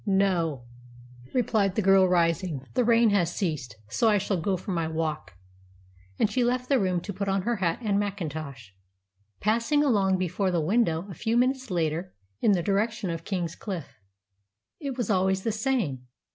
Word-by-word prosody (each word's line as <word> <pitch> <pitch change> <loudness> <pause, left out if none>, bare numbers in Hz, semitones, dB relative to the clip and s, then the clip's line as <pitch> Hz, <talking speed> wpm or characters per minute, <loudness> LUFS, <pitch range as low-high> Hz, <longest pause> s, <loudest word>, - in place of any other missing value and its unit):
"No," 180 -9 +1 0.7
replied 210 -6 +1
the 215 - +1
girl, 195 0 +6
rising. 170 -4 +1
"The 250 - +2
rain 230 -1 +4
has 175 -4 +1
ceased, 155 - -3
so 220 - +2
I 210 - +4
shall 200 -1 -1
go 190 +3 0
for 190 +3 -6
my 165 -3 0
walk;" 155 - -3 0.8
and - - +3
she 245 +4 0
left 250 +1 0
the 275 -2 +4
room 185 -3 0
to 200 - -6
put 200 +1 -3
on 195 -1 0
her 235 +1 0
hat 170 -3 0
and 200 -2 +1
mackintosh, 155 - -5 0.7
passing 235 +8 +2
along 200 -8 +3
before 185 +2 -1
the 175 -2 +1
window 170 -1 +1
a 195 - -8
few 225 +8 -1
minutes 260 0 +1
later 170 0 -2 0.2
in 205 - +4
the 175 -3 0
direction 210 0 0
of 165 0 -5
King's 175 -4 -2
Cliffe. 185 -8 -7 0.8
It 275 -4 -4
was 235 -4 -1
always 190 0 +1
the 225 - 0
same. 210 - -1
190 Hz, 175 wpm, -27 LUFS, 165-220 Hz, 0.8 s, girl